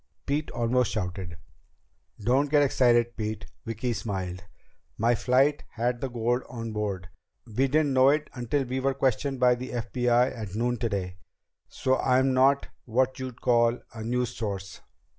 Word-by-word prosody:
Pete 145 +2 -1
almost 120 +1 +1
shouted. 90 -5 -4 0.8
"Don't 130 +7 +2
get 145 0 +5
excited, 120 -3 +3
Pete." 110 -1 -4 0.2
Vicki 115 +2 -2
smiled. 95 -4 -4 0.5
"My 115 +2 +3
flight 135 +5 +2
had 120 +1 -1
the 135 - -2
gold 120 +1 0
on 115 -2 -5
board. 100 -4 -3 0.4
We 125 +4 0
didn't 145 0 +2
know 130 +1 +6
it 150 +1 +1
until 130 +2 -1
we 130 +1 -3
were 135 0 0
questioned 135 +1 0
by 125 -1 +5
the 125 +1 -6
FBI 125 +1 +1
at 105 -4 -6
noon 120 +2 0
today. 100 -6 -3 0.5
So 130 -1 0
I'm 130 +1 +3
not 135 +2 +4 0.2
what 130 +3 +1
you'd 130 -2 -6
call 120 0 +3
a 110 -1 -7
news 125 +1 -1
source." 100 -4 -5
120 Hz, 155 wpm, -27 LUFS, 110-130 Hz, 0.8 s, know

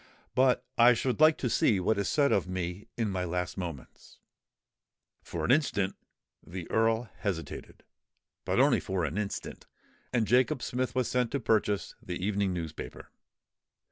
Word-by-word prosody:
But 130 -1 +3
I 120 +1 +7
should 125 +3 -1
like 155 0 +6
to 125 - -2
see 110 -3 +3
what 100 +3 +1
is 100 - 0
said 145 -2 +3
of 95 - +2
me 90 +1 -4
in 110 -3 0
my 90 -1 -1
last 90 0 -2
moments." 85 -8 -8 1.0
For - - -4
an - - +2
instant 115 -9 +2 0.5
the 90 0 -7
Earl 115 +1 +2
hesitated—but 90 -5 -6
only - - +5
for 95 -3 -2
an 80 +7 -2
instant; 105 -2 -5 0.4
and 120 -3 +2
Jacob 125 +1 +2
Smith 125 -1 -2
was 130 -2 +1
sent 125 -2 +1
to 140 - +1
purchase 105 -4 +1
the 90 - -5
evening 100 +1 0
newspaper. 80 -3 -6
105 Hz, 150 wpm, -29 LUFS, 90-125 Hz, 1.0 s, I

